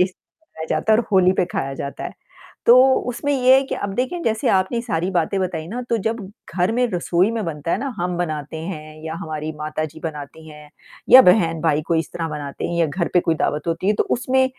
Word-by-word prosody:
ये - - +6
खाया 190 - -13
जाता 220 - +1
है 215 - +5
और 240 - +1
होली 185 -1 +5
पे 185 - +1
खाया 135 -5 -3
जाता 140 +1 -6
है। - - -5 0.5
तो, 255 +2 +7
उसमें 250 +4 -2
ये 260 -1 +5
है 270 - +3
कि - - -4
अब 200 -1 -4
देखिए 260 - -2
जैसे 220 -1 0
आपने 190 +5 +1
सारी 185 -6 -2
बातें 180 +2 0
बताई 170 -4 -3
ना, 240 +6 -4
तो 235 -1 -1
जब 225 +3 -2 0.3
घर 180 +4 +1
में 245 +2 +2
रसोई 180 +2 +1
में 225 -2 -2
बनता 160 -1 -4
है - - +1
ना, 275 +4 -3
हम 175 0 -2
बनाते 155 -3 -3
हैं 155 -2 -7
या 160 0 -4
हमारी 155 0 -4
माताजी 155 0 -4
बनाती 160 0 -7
हैं 150 -1 -13 0.4
या 260 +1 +11
बहन-भाई 165 -6 +3
कोई 165 - +1
इस 160 - -3
तरह 165 -1 -3
बनाते 145 -2 -5
हैं 170 - -3
या 165 - +3
घर 170 +4 -2
पे 180 - +6
कोई 165 - 0
दावत 150 0 -2
होती 165 +2 -2
है, 205 - +4
तो - - +1
उसमें 260 +2 +2
175 Hz, 230 wpm, -21 LUFS, 155-225 Hz, 0.5 s, या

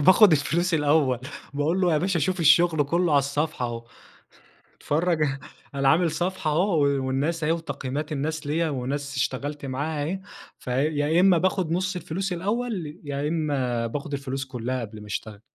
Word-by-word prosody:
باخذ 185 +6 +7
الفلوس 165 +4 +1
الأول، 145 -4 +3 0.4
باقول 155 +6 +1
له 180 -2 +3
يا 155 - +3
باشا 180 +1 0
شوف 180 +4 0
الشغل 160 -1 +5
كله 170 +3 +1
على 145 - +6
الصفحة 140 -1 -1
أهو 115 -1 -6 0.9
اتفرج 160 +1 +1 0.5
أنا 135 -1 +3
عامل 165 0 +3
صفحة 175 -1 -1
أهو 170 -1 +2
و 140 -2 +1
والناس 150 +5 -1
أهي 155 - +2
وتقييمات 150 -3 -3
الناس 155 +1 -3
ليا 160 +2 +1
وناس 140 +1 -3
اشتغلت 140 +3 -2
معاها 145 +3 -2
أهي. 185 +6 -3 0.4
فيا 145 +5 +1
إما 185 -1 +6
باخد 185 -1 0
نص 185 +2 0
الفلوس 180 +2 -3
الأول، 190 -4 -3
يا 145 0 -2
إما 135 -7 -1
باخد 145 +5 -5
الفلوس 135 -1 -3
كلها 125 -1 -3
قبل 110 -1 -8
ما 105 - -11
اشتغل. 105 0 -5
150 Hz, 160 wpm, -25 LUFS, 140-170 Hz, 0.9 s, باخذ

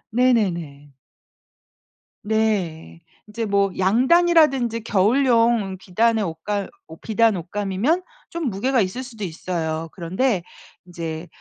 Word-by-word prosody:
네네네. 170 - 0 1.3
네. 195 - -1 0.3
이제 225 +2 -4
뭐 200 -1 +1
양단이라든지 260 - +3
겨울용 230 -1 +2
비단의 220 +4 +1
옷감 195 +4 -3 0.2
옷 160 - -13
비단 225 -1 +2
옷감이면 205 - -1 0.3
좀 335 -5 -3
무게가 250 +6 0
있을 200 +7 -3
수도 225 -4 -9
있어요. 165 -1 -4
그런데 190 +4 -1 0.4
이제 165 -1 -6
205 Hz, 230 characters per minute, -22 LUFS, 175-235 Hz, 1.3 s, 양단이라든지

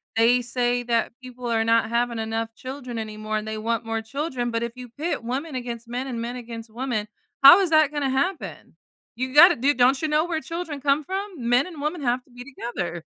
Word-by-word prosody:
they 235 +2 +4
say 245 0 0
that 235 -1 0
people 250 -1 -8
are 225 -1 +1
not 230 0 +2
having 235 0 0
enough 225 +1 -3
children 255 -2 -6
anymore 215 0 -4
and 215 0 -5
they 220 0 -4
want 230 +1 -2
more 225 0 -2
children, 250 0 -3
but 230 0 -1
if 235 - -3
you 250 -1 -9
pit 300 +4 -3
women 265 +5 -4
against 240 -2 -5
men 245 +2 -3
and 240 -3 -4
men 240 +1 -4
against 230 -2 -8
women, 235 -3 -3 0.4
how 280 +7 +11
is 380 -3 +1
that 310 -2 +4
gonna 290 -2 -1
happen? 310 +8 -3 0.4
You 255 +2 -3
gotta 345 +5 +9
do 275 +5 +2
don't 260 +1 +3
you 315 - 0
know 305 +1 +2
where 335 -2 -2
children 330 -3 -5
come 280 +2 +2
from? 380 - -5
Men 245 +3 +4
and 325 -5 -9
women 300 +3 -2
have 250 0 0
to - - -26
be 245 0 -10
together. 215 - -5
245 Hz, 220 wpm, -24 LUFS, 230-285 Hz, 0.4 s, how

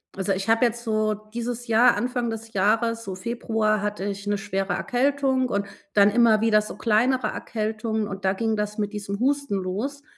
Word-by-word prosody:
Also, 195 0 -1
ich 195 0 -3
habe 225 +2 +4
jetzt 235 0 -2
so 215 -2 +1
dieses 230 +3 -6
Jahr 230 +2 +5
Anfang 245 +2 -1
des 225 0 -7
Jahres, 225 +4 +1
so 195 -4 -5
Februar, 220 0 -1
hatte 210 -1 -3
ich 200 0 -5
'ne 205 0 +1
schwere 195 0 -2
Erkältung 265 0 +1
und 200 0 -1 0.3
dann 205 0 +5
immer 230 -1 +5
wieder 220 -1 +4
so 210 - -8
kleinere 235 +2 +2
Erkältungen, 220 0 -3
und 195 -1 -7
da 190 - +3
ging 220 +2 -1
das 210 0 -3
mit 210 0 -2
diesem 200 -1 -4
Husten 280 -2 0
los. 215 +10 -4
220 Hz, 190 wpm, -24 LUFS, 205-235 Hz, 0.3 s, Jahr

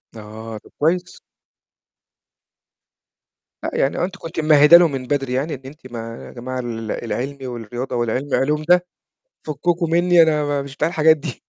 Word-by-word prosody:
آه، 110 +1 -8
طَب - - -16
كويس. 175 +4 0 2.4
لأ، - - -2
يعني 135 - 0
هو - - 0
أنتِ 190 +2 -3
كنتِ 165 -2 -6
ممهّد 150 0 +5
لهم 170 -2 +8
من 135 -2 -4
بدري 135 -2 -1
يعني 140 +5 -1
إن 135 - -7
أنتِ 135 -2 -12
ما 115 0 -7
يا - - -11
جماعة 130 +1 -5
ال 115 -3 -4
العلمي 130 +4 -4
والرياضة 120 +1 -5
والعلمي 120 +4 -1
العلوم 150 +3 0
ده 180 +2 +4 0.6
فثكُكُم 165 +3 -1
منّي 175 0 +5
أنا 155 -2 +2
ما 145 -1 -1
مش 140 0 -10
بتاع 155 - +1
الحاجات 160 -1 +4
دي، 140 -4 -7
140 Hz, 165 wpm, -20 LUFS, 120-160 Hz, 2.4 s, لهم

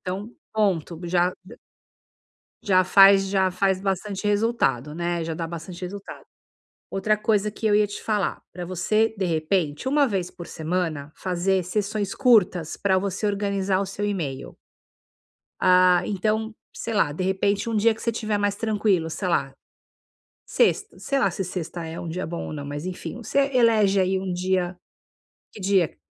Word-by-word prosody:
Então, 195 +4 -5 0.2
ponto, 185 -6 0
já 175 +1 +2
d 220 +6 -13 1.1
já 185 -2 +4
faz 195 +1 +7
já 190 -1 +2
faz 190 +1 +1
bastante 195 +1 -2
resultado, 205 - +1
né. 170 0 -2
Já 165 0 -3
dá 165 +1 -3
bastante 170 +2 -8
resultado. 200 +2 -7 0.7
Outra 210 +2 +1
coisa 210 -1 +1
que 215 +2 -4
eu 210 - +4
ia 210 0 +4
te 205 - -8
falar, 210 -4 -1
pra 180 - -7
você 215 +5 +1
de 190 - 0
repente, 160 - -1
uma 285 +1 +3
vez 190 -5 -2
por 175 - -10
semana, 160 -3 -3
fazer 185 +1 0
sessões 205 +2 -2
curtas 205 - +3
pra 195 -2 +2
você 195 +2 -2
organizar 200 -2 0
o 200 - -1
seu 200 +2 -3
email. 160 -10 -4 1.1
Ah, 180 -1 +6
então, 215 +2 -1 0.2
sei 230 - -4
lá, 165 -8 +2
de 160 - -4
repente 195 +3 0
um 225 - -1
dia 225 +2 +4
que 225 - -14
você 230 - 0
estiver 215 -2 -2
mais 205 0 0
tranquilo, 205 -6 +1
sei 185 +3 -3
lá, 135 -6 0 0.9
sexta, - - +1
sei 275 - -1
lá 200 -8 +2
se 190 - -3
sexta 175 -1 -5
é 160 +1 -6
um - - -6
dia 180 +3 -4
bom 170 +1 -5
ou - - -6
não, 145 -2 -5
mas 145 +3 -5
enfim, 185 +5 -6
você 240 +4 -1
elege 220 -6 +4
aí 190 0 +1
um 190 -1 -4
dia, 180 0 -1 0.7
que - - -13
dia? 190 -4 +2
190 Hz, 170 wpm, -24 LUFS, 175-210 Hz, 1.1 s, faz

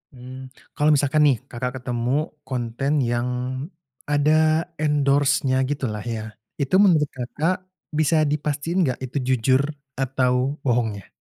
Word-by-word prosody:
Mmm, 130 +1 -9 0.3
kalau 150 0 +3
misalkan 145 +2 +2
nih 135 - +4 0.2
Kakak 125 +1 -3
ketemu 120 0 -2 0.4
konten 130 +2 -2 0.2
yang 120 +1 0 0.8
ada 145 +1 +3 0.5
endorse-nya 140 -2 +2
gitulah 130 -7 -2 0.2
ya, 110 - -5 0.4
itu 140 +6 +1
menurut 155 -7 +4
Kakak 145 +8 -1 0.4
bisa 155 0 +3
dipastiin 150 +3 -2
nggak 125 - -2
itu 130 +3 -5
jujur 130 +1 +3 0.4
atau 130 +1 +1
bohongnya? 115 -6 0
135 Hz, 120 wpm, -23 LUFS, 125-145 Hz, 0.8 s, nih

